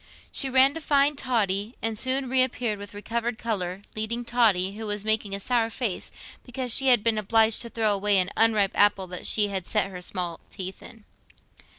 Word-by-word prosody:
She 270 Hz, -, -1 dB
ran 265 Hz, +1 st, +5 dB
to 325 Hz, -, -6 dB
find 285 Hz, 0 st, +2 dB
Totty, 220 Hz, -5 st, -1 dB
and 225 Hz, -1 st, -3 dB
soon 260 Hz, +4 st, 0 dB
reappeared 250 Hz, -4 st, 0 dB
with 205 Hz, 0 st, -10 dB
recovered 230 Hz, +2 st, -3 dB
colour, 195 Hz, -5 st, -3 dB
leading 230 Hz, +3 st, -2 dB
Totty, 210 Hz, -6 st, +2 dB
who 220 Hz, 0 st, -6 dB
was 205 Hz, 0 st, -3 dB
making 215 Hz, -2 st, +1 dB
a -, -, -5 dB
sour 230 Hz, +1 st, 0 dB
face 230 Hz, -5 st, -3 dB, 0.3 s
because 250 Hz, -1 st, -2 dB
she 270 Hz, -, +3 dB
had 245 Hz, -5 st, +5 dB
been 225 Hz, -2 st, +1 dB
obliged 220 Hz, +1 st, +3 dB
to 235 Hz, -, -3 dB
throw 220 Hz, -2 st, +1 dB
away 200 Hz, 0 st, +2 dB
an 185 Hz, +1 st, +1 dB
unripe 215 Hz, -3 st, +3 dB
apple 205 Hz, -2 st, +3 dB
that 180 Hz, -1 st, -6 dB
she 210 Hz, -1 st, +2 dB
had 190 Hz, -3 st, -4 dB
set 200 Hz, -3 st, 0 dB
her 180 Hz, -1 st, -8 dB
small 175 Hz, -2 st, -4 dB
teeth 190 Hz, -1 st, -7 dB
in. 225 Hz, -2 st, -14 dB
220 Hz, 195 wpm, -25 LUFS, 200-240 Hz, 0.3 s, ran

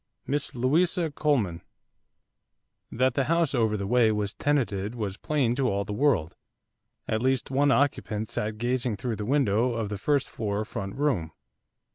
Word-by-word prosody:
MISS 145 Hz, -1 st, -2 dB
LOUISA 160 Hz, +6 st, +2 dB
COLEMAN 120 Hz, -, 0 dB, 1.3 s
That 130 Hz, +2 st, +2 dB
the 135 Hz, 0 st, +1 dB
house 165 Hz, 0 st, +1 dB
over 110 Hz, -4 st, +1 dB
the 100 Hz, -, -3 dB
way 115 Hz, +1 st, +4 dB
was 105 Hz, -1 st, -1 dB
tenanted 115 Hz, -7 st, -1 dB
was 105 Hz, -5 st, -3 dB
plain 135 Hz, 0 st, 0 dB
to 135 Hz, -2 st, +2 dB
all 100 Hz, 0 st, -1 dB
the 105 Hz, -, -4 dB
world, 105 Hz, -, +1 dB, 0.7 s
at 110 Hz, 0 st, 0 dB
least 130 Hz, +1 st, 0 dB
one 140 Hz, +2 st, +3 dB
occupant 115 Hz, -6 st, 0 dB
sat 105 Hz, 0 st, -3 dB
gazing 120 Hz, -1 st, -1 dB
through 115 Hz, +1 st, -3 dB
the 105 Hz, -, -4 dB
window 125 Hz, -3 st, +2 dB
of 110 Hz, -3 st, -2 dB
the 105 Hz, -2 st, -4 dB
first 140 Hz, +3 st, +1 dB
floor 105 Hz, -1 st, -3 dB
front 95 Hz, -2 st, -5 dB
room. 115 Hz, -, 0 dB
120 Hz, 160 wpm, -27 LUFS, 105-140 Hz, 1.3 s, way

